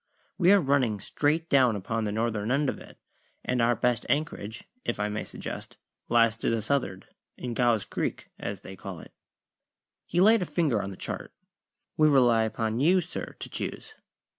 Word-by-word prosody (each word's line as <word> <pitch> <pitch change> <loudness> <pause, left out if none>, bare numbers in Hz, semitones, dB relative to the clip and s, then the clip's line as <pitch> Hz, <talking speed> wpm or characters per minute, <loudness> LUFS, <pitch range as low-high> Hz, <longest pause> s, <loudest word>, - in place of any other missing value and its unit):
"We 180 0 +6
are 205 - +7
running 135 - +1
straight 150 +10 0
down 130 -7 +4
upon 110 +3 -2
the 105 - -1
northern 110 -1 -1
end 140 +1 +2
of - - -4
it, - - -14 0.5
and 125 -1 +1
our 120 +1 +3
best 120 -1 +1
anchorage 110 -7 -2 0.2
(if - - -2
I 105 0 0
may 105 0 -3
suggest) - - -7 0.3
lies 115 -1 +4
to - - -1
the 115 -2 0
south'ard 105 -7 -1 0.3
in 125 -1 -4
Gow's 115 -3 +2
Creek, - - -3
as - - -5
they 95 - -9
call 95 -2 -7
it." - - -13 0.9
He 175 - 0
laid 215 +3 +6
a - - 0
finger 150 -8 +1
on 100 - -4
the 95 - -9
chart. - - -6 0.6
"We 155 - +5
rely 120 -5 +5
upon 110 +1 -2
you, 175 +7 +5
sir, 180 0 -6
to - - -6
choose." 440 - -5
120 Hz, 185 wpm, -28 LUFS, 110-145 Hz, 0.9 s, are